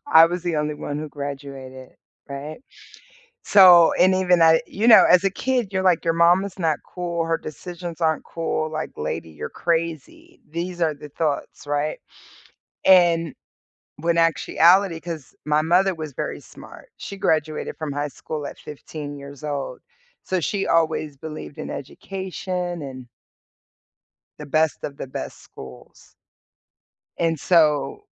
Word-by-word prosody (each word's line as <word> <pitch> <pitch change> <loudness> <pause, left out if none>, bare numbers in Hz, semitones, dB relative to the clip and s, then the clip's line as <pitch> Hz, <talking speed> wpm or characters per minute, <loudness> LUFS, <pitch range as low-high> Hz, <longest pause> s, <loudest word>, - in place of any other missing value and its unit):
I 160 +1 +8
was 175 +1 -4
the 170 -3 -1
only 150 0 -1
one 145 0 -5
who 155 0 -5
graduated, 135 -2 -8 0.3
right? 140 +5 -7 0.8
So, 180 -4 +8
and 185 +1 +4
even 180 -2 +3
I 160 0 +6
you 220 +4 0
know, 220 - +9
as 180 - +6
a 195 - +2
kid, 245 -1 -1
you're 190 0 -1
like, 180 -3 +3
"Your 165 - +2
mom 170 +3 +4
is 200 -1 -8
not 160 -4 0
cool, 170 -2 -3
her 165 0 0
decisions 170 +2 -8
aren't 160 -1 +1
cool." 160 -1 -2
Like, 155 0 -4
"Lady, 80 +2 -4
you're 75 - -7
crazy." 165 -3 -3
These 175 +2 -4
are 160 -2 +2
the 150 +1 -11
thoughts, 145 -1 -3
right? 145 +1 -1 0.9
And, 170 -4 +5 0.6
when 170 +2 0
actuality 170 +2 +3
'Cause 165 -6 -8
my 150 0 +2
mother 180 +4 +3
was 155 -3 -7
very - - -4
smart. - - -14
She 200 - -8
graduated 155 -5 -1
from 155 -2 -4
high 145 +1 -2
school 150 +2 -6
at - - -7
15 150 0 -8
years 140 +1 -11
old. 140 -2 -4 0.4
So 185 - -1
she 195 +4 -1
always 155 -3 +1
believed 155 -1 -8
in - - -5
education 180 +1 -5
and 130 -3 -8 1.3
The 150 - -7
best 155 +2 0
of 140 - -6
the - - -5
best 130 - -7
schools. 65 -1 -14 1.1
And 165 -2 +1
so 150 - +2
160 Hz, 150 wpm, -23 LUFS, 145-175 Hz, 1.3 s, know